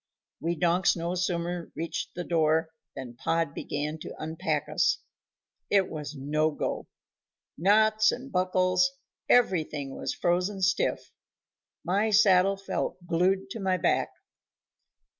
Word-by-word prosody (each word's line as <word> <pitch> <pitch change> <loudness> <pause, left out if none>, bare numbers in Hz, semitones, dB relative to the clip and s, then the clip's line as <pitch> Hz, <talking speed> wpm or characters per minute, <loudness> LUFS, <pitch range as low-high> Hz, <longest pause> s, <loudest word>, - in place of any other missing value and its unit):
We 170 +1 -1
donks 175 +2 +2
no 170 +1 -2
sooner 175 -1 -2
reached 165 +1 -4
the 175 - -3
door 160 -1 +2 0.3
than 125 -3 -7
Pod 165 +1 0
began 150 +2 -4
to - - -8
unpack 160 +3 -2
us. - - +2 0.7
It 195 -2 +3
was 150 -2 -6
no 150 +3 0
go. 150 - -4 0.7
Knots 215 +4 +4
and 265 +2 -7
buckles, 185 0 +2 0.4
everything 155 - +2
was - - -3
frozen 180 +3 0
stiff; 190 +1 0 0.7
my 200 +5 +1
saddle 195 -2 +5
felt 195 -1 -3
glued 190 +3 +1
to 225 - -5
my 190 -2 +1
back. - - +1
175 Hz, 120 wpm, -28 LUFS, 160-190 Hz, 0.7 s, saddle